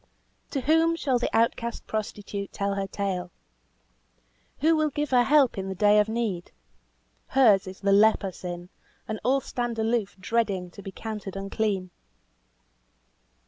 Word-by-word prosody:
To 275 - -2
whom 325 +4 +3
shall 265 -6 0
the - - -1
outcast 230 +1 0
prostitute 205 -2 -4
tell 200 0 -1
her 195 0 -2
tale? 190 -3 -3 1.3
Who 320 +2 +4
will 310 -1 +2
give 295 0 -3
her 250 -1 +5
help 270 -4 +4
in 190 - -4
her 190 - -4
day 210 +2 +5
of 210 +1 +2
need? 220 -6 -2 0.8
Hers 220 -8 +4
is 185 0 -9
the 200 0 +2
leper 205 -1 +4
sin, 175 0 -7 0.4
and 215 -1 -3
all 265 +4 +2
stand 240 -3 -3
aloof 225 -2 0
dreading 195 -4 -1
to 200 - -11
be 195 - -7
counted 210 -2 -6
unclean. 195 -1 -2
215 Hz, 145 wpm, -26 LUFS, 195-240 Hz, 1.3 s, her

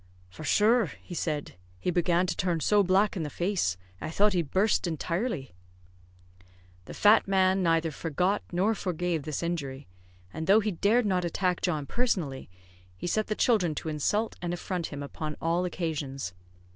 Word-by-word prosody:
"For 95 - -10
shure," 220 +8 +4 0.2
he 180 - -9
said, 150 - -3 0.2
"he 180 - 0
began 175 +1 +2
to - - -2
turn 175 -3 0
so 205 +6 +4
black 195 +3 +3
in 180 - -2
the 150 - -3
face, 175 - 0 0.2
I - - -3
thought 205 +5 +3
he'd 170 -6 0
burst 195 +1 +2
intirely." 165 - -2 1.3
The - - -9
fat 210 +1 +5
man 190 0 +3
neither 165 -2 +2
forgot 180 +7 0
nor 190 +5 +2
forgave 175 -6 -2
this 155 +1 -3
injury; 145 -5 -3 0.5
and 160 - -4
though 200 +3 +7
he 215 -1 -1
dared 215 +7 +2
not 185 -3 +1
attack 180 +1 0
John 155 -5 -1
personally, 175 - -1 0.5
he - - -6
set 215 +5 0
the 215 - -1
children 185 -11 +2
to 160 - -4
insult 205 +9 0
and 175 -1 -2
affront 175 -1 -3
him 145 -1 -6
upon 150 +1 -5
all 170 +2 +1
occasions. 145 - -3
175 Hz, 170 wpm, -28 LUFS, 155-195 Hz, 1.3 s, though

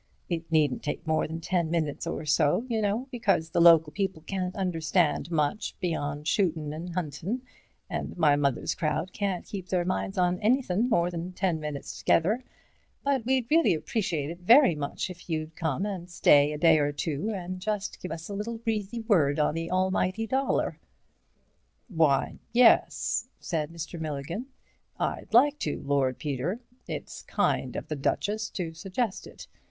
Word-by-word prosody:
It 165 -1 -3
needn't 150 -5 +2
take 145 - -4
more 160 0 +1
than 165 +1 -6
ten 170 -1 0
minutes 160 -2 -1
or 165 -2 -3
so, 150 - +2
y'know, 220 +1 0
because 195 - +1
the 170 - +2
local 165 -2 +7
people 190 -2 -2
can't 185 +1 -3
understand 170 -3 +1
much 155 +3 -1
beyond 145 -4 -2
shootin' 160 -6 +1
and 170 +2 -6
huntin', 180 - -3 0.4
and - - -4
my 150 -4 +5
mother's 140 -3 0
crowd 160 +2 -2
can't 195 -4 -2
keep 190 -3 -6
their 180 -2 +1
minds 190 +1 -2
on 180 0 +2
anythin' 230 -1 +2
more 175 -5 +2
than 175 +1 -5
ten 180 -3 0
minutes 150 -2 -6
together, 210 +10 +2 0.6
but 275 -4 +1
we'd 260 -1 +1
really 320 - +5
appreciate 165 -4 -2
it 170 - -9
very 235 - +6
much 150 +4 -3
if 175 0 -13
you'd 155 0 -3
come 160 +3 -1
and 185 -4 -5
stay 145 -4 +5
a 150 - -3
day 160 0 +5
or 145 0 +1
two 150 +5 -2
and 185 0 -5
just 205 +1 -3
give 180 - -5
us 165 0 -6
a 205 - -6
little 220 +3 -4
breezy 225 -1 -2
word 165 -11 +3
on 150 -1 +2
the 165 +1 -3
almighty 185 +3 +1
dollar." 265 +4 0 1.1
"Why, 160 -7 +2
yes," 240 0 +4
said 155 -4 -2
Mr. 165 0 -6
Milligan, 160 - -4 0.5
"I'd - - -2
like 285 +6 +5
to, 150 - -2
Lord 135 -2 +1
Peter. 150 - -2 0.3
It's - - -6
kind - - 0
of - - -5
the 155 - -3
Duchess 210 +9 -1
to 170 -4 -4
suggest 195 +6 -3
it. - - -12
175 Hz, 165 wpm, -28 LUFS, 155-205 Hz, 1.1 s, local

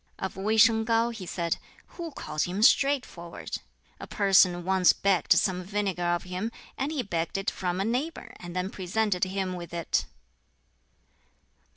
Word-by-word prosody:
Of 190 - -4
Wei 210 +4 0
shang 225 0 +6
Kau 230 +1 +2
he 205 -6 -8
said, 170 -2 -1 0.3
"Who 340 -2 -7
calls 155 - -3
him 190 +4 -2
straightforward? 245 -11 +1 0.4
A - - -8
person 185 -3 +4
once 190 -1 +4
begged 195 -3 +3
some 185 -3 +1
vinegar 195 -1 -2
of 175 0 0
him, 185 +5 -4 0.2
and 275 +3 -2
he 290 -5 -1
begged 170 -3 -2
it 195 - -1
from 180 -1 -3
a 195 - 0
neighbor, 260 +9 -3
and 175 0 -9
then 185 +2 -2
presented 190 0 0
him 190 0 -2
with 175 -1 -7
it!" 170 -2 0
190 Hz, 160 wpm, -27 LUFS, 180-220 Hz, 0.4 s, shang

